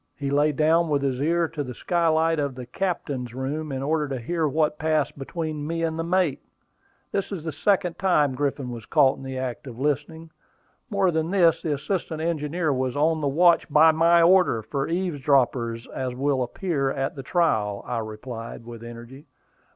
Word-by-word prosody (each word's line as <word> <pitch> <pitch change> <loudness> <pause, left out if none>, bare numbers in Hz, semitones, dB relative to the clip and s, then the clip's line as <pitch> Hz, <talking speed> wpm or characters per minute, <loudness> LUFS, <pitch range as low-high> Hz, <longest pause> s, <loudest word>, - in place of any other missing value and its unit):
He 140 -1 -3
lay 145 +2 +3
down 160 +3 +2
with 145 -2 +1
his 135 -1 -1
ear 170 +2 +2
to 150 -3 -4
the 125 -3 -7
skylight 165 0 +1
of 140 -3 -2
the 125 -1 -7
captain's 130 - -3
room 145 +4 -3
in 135 0 -3
order 150 +1 0
to 135 -2 -4
hear 160 +6 -1
what 150 +1 0
passed 155 -2 0
between 150 +1 -4
me 165 +1 -2
and 160 0 -1
the - - 0
mate. 175 -3 +1 0.7
This 195 - -2
is 185 -6 -5
the 160 - -3
second 180 +3 0
time 150 -8 +3
Griffin 135 -2 -2
was 115 -2 -8
caught 140 -4 +4
in - - -11
the 130 0 -5
act 130 +1 -4
of 120 -3 -8
listening. 150 +4 -2 0.6
More 200 -4 +2
than 160 0 -1
this, 170 -4 +3
the 155 - -1
assistant 160 +2 -3
engineer 160 -1 -1
was 130 -1 -1
on 160 +2 +2
the 145 - 0
watch, 170 +4 +4
by 155 +2 +7
my 170 +2 +4
order, 175 - +4
for 135 +4 -3
eavesdroppers, 135 -9 0
as 130 -1 -4
will 135 0 0
appear 135 +2 -1
at 135 +1 -2
the 135 - -6
trial," 110 - 0
I 120 -1 -2
replied, 115 +1 -7
with 115 -1 -9
energy. 120 +4 -11
150 Hz, 190 wpm, -25 LUFS, 130-165 Hz, 0.7 s, by